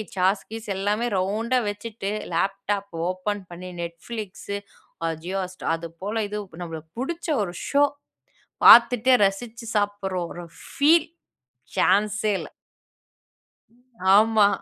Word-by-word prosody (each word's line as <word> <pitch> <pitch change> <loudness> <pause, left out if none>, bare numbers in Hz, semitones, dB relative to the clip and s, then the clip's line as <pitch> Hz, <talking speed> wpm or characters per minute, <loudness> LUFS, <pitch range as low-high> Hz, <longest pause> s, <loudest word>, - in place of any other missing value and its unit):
Sauce, 190 +2 +2
keys 225 0 -7
எல்லாமே 205 +4 0
ரவுண்டா 220 +7 +1
வச்சிட்டு, 205 -1 -5 0.2
லேப்டாப் 195 +3 -1 0.2
ஓப்பன் 195 +2 -3
பண்ணி 180 +1 -8
Netflix, 185 +5 -6 0.7
ஆ - - +1 0.2
Jio 185 +3 -3
Hotstar, 185 0 -7
அதுபோல 175 +7 -4
இது 210 - -4 0.3
நம்மளுக்கு 160 -1 -8
புடிச்ச 335 +7 -4 0.2
ஒரு 175 -3 -5
ஷோ 285 +1 +4 0.8
பாத்துட்டே 245 +1 +8
ரசிச்சு 230 +4 -5
சாப்டுற 205 -2 -1 0.2
ஒரு 175 - -8 0.2
ஃபீல், 315 +3 +4 0.7
சான்ஸே 210 +2 +2
இல்ல. - - -8 1.6
ஆமா. 215 0 +6
205 Hz, 105 wpm, -24 LUFS, 185-225 Hz, 1.6 s, பாத்துட்டே